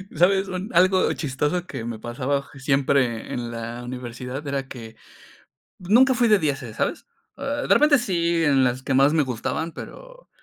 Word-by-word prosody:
¿Sabes?, 190 +4 +3
un 185 +3 -4
algo 185 +2 +4
chistoso 150 +5 -2
que 115 - -6
me 115 -2 -5
pasaba 130 +4 -2
je 135 - -15
siempre 135 -4 0
en 120 -1 -4
la 115 +1 -6
universidad 125 +2 -6
era 140 -1 -3
que 115 -4 -10 0.8
nunca 240 +8 +4
fui 240 -1 +2
de 210 -1 +5
dieces, 135 -8 -3
¿sabes?, - - -2 0.3
eh, 285 +1 -3
e - - -3
repente, 300 -2 +5
sí, 170 -7 0
en 140 -3 +3
las 125 +1 -1
que 135 - -2
más 135 +3 +5
me 155 - +3
gustaban, 160 +7 -3
pero - - -11
145 Hz, 175 wpm, -23 LUFS, 125-185 Hz, 0.8 s, de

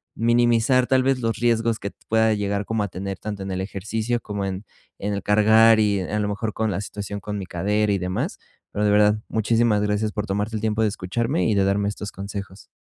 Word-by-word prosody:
minimizar, 120 +2 +3
tal 130 -1 +3
vez, 135 -1 +1
los 115 -1 -1
riesgos 115 -1 +1
que 100 - -5 0.2
pueda 110 0 +3
llegar 100 -1 -1
como 110 -1 -1
a 100 - -3
tener, 95 +2 -5
tanto 105 -1 -6
en 95 - -5
el 95 0 -2
ejercicio 110 +5 -2
como 100 -1 -4
en 95 +1 -4 0.3
en 105 +1 -2
el 100 -1 -3
cargar 110 +2 +5
y, 100 -2 +2
a 105 +3 -2
lo 105 - 0
mejor, 105 +1 -3
con 110 0 -1
la 100 - -2
situación 100 0 -6
con 105 +1 -4
mi 95 - -5
cadera 105 +4 0
y - - +1
demás, 90 0 -3 0.3
pero 105 - -1
de 105 - +3
verdad, 105 0 +5
muchísimas 110 0 +2
gracias 105 +1 0
por 105 0 -3
tomarte 105 +2 -2
el - - -5
tiempo 110 0 0
de 110 - +3
escucharme 115 - -1
y 110 - +2
de 100 - +3
darme 100 +1 +1
estos 105 0 -6
consejos. 100 0 -8
105 Hz, 225 wpm, -23 LUFS, 100-110 Hz, 0.3 s, cargar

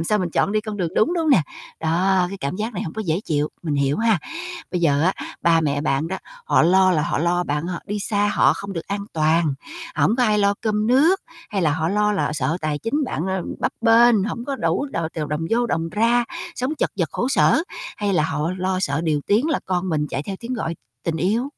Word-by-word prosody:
làm - - -2
sao 210 +5 +2
mình 180 -3 -1
chọn 200 - +1
đi 215 - +2
con 215 -1 -6
đường 180 -4 -1
đúng, - - +3
đúng 335 - 0
hông 315 - +2
nè? 240 - +6 0.4
Đó, 180 +3 +2
cái 195 0 -7
cảm 140 +6 -2
giác 220 +3 -3
này - - -3
hông 160 - -5
có 220 - -3
dễ 165 +2 0
chịu, 150 -1 0
mình 155 -4 -1
hiểu 140 0 +1
ha. 225 -4 +3 0.5
Bây 180 - -1
giờ 145 -3 +3
á, 185 - +3 0.3
ba 165 -1 +4
mẹ 145 -2 0
bạn 150 +1 0
đó 190 +2 -3 0.3
họ 475 - +3
lo 185 +3 +5
là 155 -3 +2
họ - - -1
lo 175 +3 +1
bạn 150 +1 -2
h 180 - -3
đi 205 +1 -2
xa 205 0 0
họ - - +5
không 200 0 -6
được 165 -3 -5
an 200 0 -3
toàn, 160 -1 +2 0.4
hổng 225 - +2
có 255 - +2
ai 215 -3 +3
lo 200 0 +3
cơm 215 -1 0
nước? 300 - +4 0.3
Hay 195 -3 -1
là 155 -3 +3
họ 160 +2 0
lo 210 +1 +2
là 200 - 0
họ - - -2
sợ 150 +2 -1
tài 155 -1 -1
chính 280 - -1
bạn, 180 -9 -3
ờ, 190 -1 -1 0.2
bấp - - 0
bênh, 230 -2 +5
hổng 235 +3 -4
có 275 0 -3
đủ 285 - 0
đ - - -8 0.2
t - - -5
đồng 150 +1 -2
vô 240 +1 +2
đồng 165 -6 -1
ra, 230 +6 +2 0.3
sống 260 +3 -2
chật - - -1
vật 170 -5 +1
khổ 245 - -1
sở? 305 +3 +4 0.3
Hay 205 -1 -1
là 155 -5 +2
họ 160 0 -1
lo 185 0 0
sợ 145 -3 0
điều 155 -3 +1
tiếng 220 +8 +3
là 305 - 0
con 185 0 -1
mình 150 -2 0
chạy 135 - -3
theo 195 +2 -5
tiếng 240 +2 -4
gọi 170 -8 -3 0.3
tình 165 -1 -1
yêu? 220 +10 0
190 Hz, 260 wpm, -22 LUFS, 160-220 Hz, 0.5 s, nè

